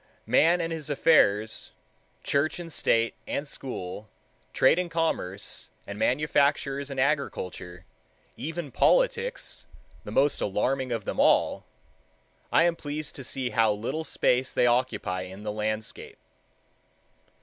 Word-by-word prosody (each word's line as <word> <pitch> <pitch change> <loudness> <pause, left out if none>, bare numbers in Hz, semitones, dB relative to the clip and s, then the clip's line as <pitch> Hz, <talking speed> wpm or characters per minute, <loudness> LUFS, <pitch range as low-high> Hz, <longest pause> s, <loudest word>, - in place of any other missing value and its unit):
Man 165 +9 +4
and 165 0 -2
his 155 -2 -6
affairs, 110 -8 +3 0.5
church 145 +5 0
and 165 -2 -7
state 115 -2 +2
and 145 - -3
school, 110 -7 -6 0.4
trade 130 +6 +4
and 180 -1 -2
commerce, 160 - -2 0.2
and 100 +1 -7
manufactures 140 +1 +1
and 135 -1 -4
agriculture 95 - -2 0.5
even 160 -2 -5
politics, - - +1 0.4
the - - -8
most 140 +2 +2
alarming 130 +6 0
of 115 -4 -2
them - - -4
all,—I - - 0
am 170 0 +2
pleased 150 -1 -5
to 135 - -6
see 130 -1 -3
how 110 -3 +3
little 115 +10 -3
space 130 -4 +1
they - - +4
occupy 120 -7 +1
in 95 +2 -9
the 105 - -3
landscape. 110 +1 -4
135 Hz, 125 wpm, -27 LUFS, 110-155 Hz, 0.5 s, Man